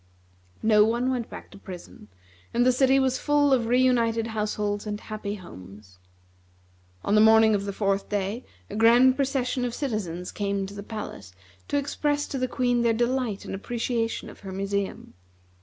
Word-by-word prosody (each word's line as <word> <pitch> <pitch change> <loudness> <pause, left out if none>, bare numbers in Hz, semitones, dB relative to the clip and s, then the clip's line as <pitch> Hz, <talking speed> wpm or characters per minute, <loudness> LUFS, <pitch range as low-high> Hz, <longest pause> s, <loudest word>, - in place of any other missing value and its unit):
No 215 -1 +6
one 240 +4 +1
went 245 -3 -3
back - - -10
to 200 - -13
prison, 180 - -11 0.5
and 240 +1 +3
the 255 - +6
city 265 +1 +4
was 265 -1 +1
full 290 -1 +3
of 240 -3 +2
re 245 +2 +3
united 230 -3 +2
households 210 -1 -2
and 210 0 -3
happy 215 -2 -5
homes. 95 - -13 1.1
On - - +1
the 215 - +6
morning 220 0 +6
of 200 -1 0
the 200 - -2
fourth 195 0 -1
day, 205 +4 -2 0.2
a - - -8
grand 240 +4 +6
procession 265 -2 -1
of 245 -1 -2
citizens 195 - -3
came 200 -1 -2
to 195 - -9
the 205 - -7
palace 200 - -8 0.3
to 285 - 0
express 290 +1 -1
to 270 - -3
the 255 - 0
Queen 245 -1 +1
their 235 -1 +3
delight 240 -2 -1
and - - -6
appreciation 230 +3 -2
of - - -12
her 195 - -8
museum. 195 +1 -3
225 Hz, 175 wpm, -26 LUFS, 200-250 Hz, 1.1 s, No